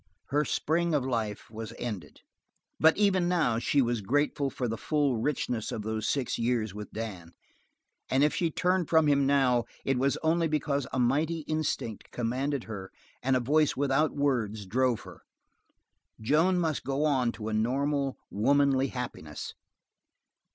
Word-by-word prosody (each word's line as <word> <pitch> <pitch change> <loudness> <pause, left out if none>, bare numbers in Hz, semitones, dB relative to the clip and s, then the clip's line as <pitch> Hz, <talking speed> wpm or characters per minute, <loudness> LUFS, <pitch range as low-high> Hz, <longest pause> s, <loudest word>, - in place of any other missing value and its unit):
Her 150 +2 +2
spring 170 +3 0
of 135 -3 +1
life 110 -5 -3
was 110 0 -7
ended, 100 - -6 0.6
but 160 0 +5
even 190 -4 +3
now 155 -11 +2
she 135 +3 +2
was 120 -2 -1
grateful 140 +5 +1
for 125 -2 -3
the 115 - -2
full 145 +1 0
richness 120 -2 -1
of 105 - -4
those 110 0 -2
six 135 -4 -1
years 115 -3 0
with 105 0 -7
Dan; 95 -7 -6 0.8
and 135 +2 +3
if 150 - +3
she 170 - +1
turned 180 +1 0
from 160 -1 +5
him 140 -2 +3
now 130 -4 +3 0.2
it 135 -2 +1
was 135 +1 +1
only 165 +1 +2
because 145 -3 -1
a - - -3
mighty 150 +7 +1
instinct 150 -8 -3
commanded 130 +3 -2
her 100 -4 -7 0.3
and 130 0 +2
a - - +3
voice 150 +4 +2
without 145 +2 +1
words 115 -8 0
drove 125 +3 +1
her - - -12 1.0
Joan 160 +11 +3
must 160 -4 0
go 140 +2 0
on 130 -5 +2
to 110 -1 -5
a - - -3
normal, 135 +5 0
womanly 135 +4 +3
happiness. 120 - -6
135 Hz, 160 wpm, -29 LUFS, 115-150 Hz, 1.0 s, but